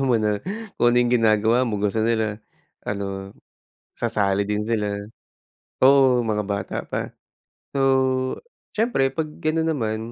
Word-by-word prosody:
alam 135 Hz, -, +1 dB
mo 120 Hz, -, +4 dB
na, 105 Hz, -2 st, 0 dB, 0.4 s
kung 120 Hz, -, +5 dB
ano -, -, +1 dB
yung 120 Hz, 0 st, +3 dB
ginagawa 110 Hz, 0 st, +3 dB
mo, 105 Hz, -, -1 dB
gusto 105 Hz, +1 st, 0 dB
nila 110 Hz, -1 st, 0 dB, 0.5 s
ano, 100 Hz, -1 st, -4 dB, 0.6 s
sasali 100 Hz, -4 st, 0 dB
din 105 Hz, 0 st, -1 dB
sila, 110 Hz, -2 st, 0 dB, 0.9 s
oo, 130 Hz, -2 st, +6 dB
mga 105 Hz, -2 st, -1 dB
bata 100 Hz, -1 st, -3 dB
pa. -, -, -3 dB, 0.7 s
So, 140 Hz, -, -1 dB, 1.0 s
siyempre 215 Hz, -, +2 dB
'pag 155 Hz, +4 st, -2 dB, 0.2 s
ganun 160 Hz, +1 st, +1 dB
naman 115 Hz, -9 st, -1 dB
110 Hz, 135 wpm, -23 LUFS, 105-125 Hz, 1.0 s, oo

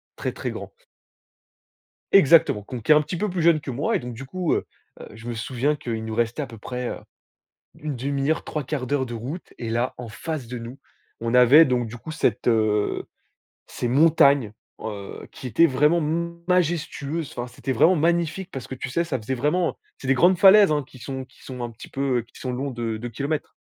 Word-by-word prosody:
très -, -, -3 dB
très -, -, -4 dB
grand. -, -, -7 dB, 1.4 s
Exactement! 155 Hz, -, +6 dB
Qu'on 120 Hz, +4 st, -7 dB
qui 150 Hz, -, +4 dB
est -, -, +9 dB
un 150 Hz, -, +6 dB
petit 155 Hz, +4 st, -5 dB
peu 205 Hz, +4 st, -1 dB
plus 180 Hz, -1 st, -2 dB
jeune 165 Hz, -2 st, +5 dB
que 140 Hz, -, -6 dB
moi, 135 Hz, +5 st, 0 dB
et -, -, +1 dB
donc 125 Hz, 0 st, -7 dB
du 130 Hz, +4 st, -8 dB
coup, 180 Hz, +2 st, -1 dB
heu -, -, 0 dB, 0.3 s
heu, -, -, -9 dB
je 115 Hz, +2 st, -11 dB
me -, -, -2 dB
souviens 130 Hz, +6 st, -1 dB
qu'il 115 Hz, -4 st, -4 dB
nous 110 Hz, -, -4 dB
restait 120 Hz, +5 st, 0 dB
à -, -, -3 dB
peu 115 Hz, -, -11 dB
près, 125 Hz, +2 st, -4 dB
heu, -, -, -5 dB, 0.8 s
1/2 140 Hz, 0 st, -2 dB
heure, 160 Hz, -, +1 dB
3/4 140 Hz, -2 st, -2 dB
de 120 Hz, -, -5 dB
route, 135 Hz, +11 st, -6 dB
et 115 Hz, -, -5 dB
là 120 Hz, +2 st, 0 dB
en 120 Hz, -3 st, -7 dB
face 150 Hz, +2 st, -5 dB
de 125 Hz, 0 st, -5 dB
nous, 120 Hz, +3 st, -8 dB, 0.4 s
on 115 Hz, +1 st, -1 dB
avait 125 Hz, +6 st, +8 dB
donc 125 Hz, -2 st, 0 dB
du 120 Hz, -, -8 dB
coup 155 Hz, -, -8 dB
cette, 155 Hz, -, 0 dB
heu, 110 Hz, -3 st, +1 dB, 0.6 s
ces -, -, -4 dB
montagnes, 140 Hz, -4 st, +4 dB, 0.3 s
heu, 105 Hz, -3 st, -7 dB
qui -, -, -9 dB
étaient 125 Hz, +8 st, +5 dB
vraiment 150 Hz, +4 st, +3 dB
m 170 Hz, +2 st, -2 dB
majestueuses, 165 Hz, -3 st, 0 dB
enfin 120 Hz, 0 st, -3 dB
c'était 130 Hz, -, -4 dB
vraiment 165 Hz, +9 st, +4 dB
magnifique 170 Hz, +3 st, 0 dB
parce 135 Hz, -7 st, -7 dB
que -, -, -6 dB
tu 130 Hz, -, -5 dB
sais 170 Hz, +7 st, 0 dB
ça 145 Hz, -6 st, -2 dB
faisait 130 Hz, +5 st, -3 dB
vraiment 150 Hz, +7 st, 0 dB, 0.2 s
c'est 130 Hz, -, -7 dB
des 135 Hz, -, +5 dB
grandes 175 Hz, +7 st, +4 dB
falaises 195 Hz, -2 st, +8 dB
hein 150 Hz, -2 st, 0 dB
qui 130 Hz, -, -15 dB
sont 130 Hz, +1 st, -6 dB
qui 125 Hz, -, -22 dB
sont 125 Hz, -2 st, -7 dB
un 120 Hz, -, -3 dB
petit 115 Hz, -, -12 dB
peu 135 Hz, -3 st, 0 dB
qui -, -, -14 dB
sont 130 Hz, -, -3 dB
longs 135 Hz, +3 st, -3 dB
de 115 Hz, -2 st, -3 dB
2 120 Hz, +2 st, -6 dB
kilomètres. 145 Hz, +6 st, -3 dB
135 Hz, 215 wpm, -24 LUFS, 120-160 Hz, 1.4 s, est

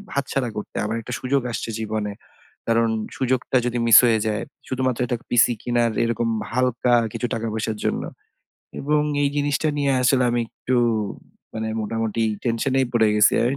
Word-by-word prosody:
হাত 140 Hz, -1 st, 0 dB
ছাড়া 130 Hz, -3 st, 0 dB
করতে। 105 Hz, -, -7 dB
আমার 110 Hz, +2 st, -2 dB
একটা 125 Hz, -, -7 dB
সুযোগ 135 Hz, +2 st, 0 dB
আসছে 115 Hz, -, -4 dB
জীবনে। 110 Hz, -2 st, -3 dB, 0.5 s
কারণ 115 Hz, 0 st, +3 dB, 0.3 s
সুযোগটা 130 Hz, 0 st, +1 dB
যদি 125 Hz, 0 st, -1 dB
মিস 115 Hz, -, +9 dB
হয়ে 115 Hz, -2 st, +3 dB
যায়, 105 Hz, -1 st, -1 dB, 0.3 s
শুধুমাত্র 130 Hz, -2 st, -1 dB
একটা 120 Hz, 0 st, -2 dB
পিসি 120 Hz, 0 st, +4 dB
কিনার 120 Hz, -1 st, +1 dB
এরকম 115 Hz, 0 st, -1 dB, 0.2 s
হালকা 125 Hz, 0 st, +1 dB, 0.2 s
কিছু 115 Hz, +1 st, -2 dB
টাকা 115 Hz, 0 st, -3 dB
পয়সার 110 Hz, -1 st, -2 dB
জন্য। -, -, 0 dB, 0.8 s
এবং 150 Hz, +1 st, +1 dB, 0.2 s
এই 140 Hz, -, +3 dB
জিনিসটা 145 Hz, +2 st, +1 dB
নিয়ে 140 Hz, -1 st, +2 dB
আসলে 125 Hz, 0 st, +3 dB
আমি 120 Hz, 0 st, +1 dB
একটু 130 Hz, 0 st, -2 dB, 0.8 s
মানে 110 Hz, 0 st, -3 dB
মোটামুটি 115 Hz, +1 st, -2 dB, 0.2 s
টেনশন 120 Hz, +3 st, 0 dB
এই 130 Hz, -, +2 dB
পড়ে 110 Hz, -2 st, +4 dB
গেছি। 105 Hz, 0 st, +5 dB
আমি 135 Hz, +3 st, 0 dB
120 Hz, 170 wpm, -23 LUFS, 115-130 Hz, 0.8 s, মিস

